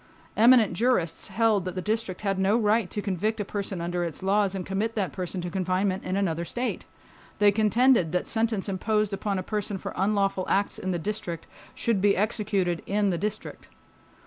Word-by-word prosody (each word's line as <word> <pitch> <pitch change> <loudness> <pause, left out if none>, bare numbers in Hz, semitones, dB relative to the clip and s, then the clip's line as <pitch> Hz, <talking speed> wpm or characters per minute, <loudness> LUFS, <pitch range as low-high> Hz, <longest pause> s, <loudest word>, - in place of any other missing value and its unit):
Eminent 230 -3 +6
jurists 200 -5 0
held 220 -4 +2
that 185 0 -5
the - - -2
District 210 -1 -2
had 195 -2 -1
no 195 +4 +3
right 215 -3 +2
to 210 - -4
convict 210 +3 -1
a 205 - -2
person 200 -2 -4
under 175 +1 -2
its 170 +1 -5
laws 195 0 +2
and 185 -2 -4
commit 210 +4 -2
that 200 -4 -1
person 185 0 -4
to 175 - -4
confinement 185 +1 0
in 185 +1 -2
another 170 -4 0
state. 245 +8 -3 0.5
They 205 -1 +5
contended 220 -2 +3
that 180 - 0
sentence 225 -3 0
imposed 210 +2 0
upon 195 0 -2
a 185 - -2
person 210 0 -3
for - - -6
unlawful 195 -1 +1
acts 200 +1 +1
in 190 - -3
the 180 - 0
District 170 -2 -4 0.3
should 225 -5 0
be 200 0 +3
executed 200 -4 0
in 205 0 +1
the 175 - -1
District. 210 +1 -5
200 Hz, 190 wpm, -26 LUFS, 185-215 Hz, 0.5 s, Eminent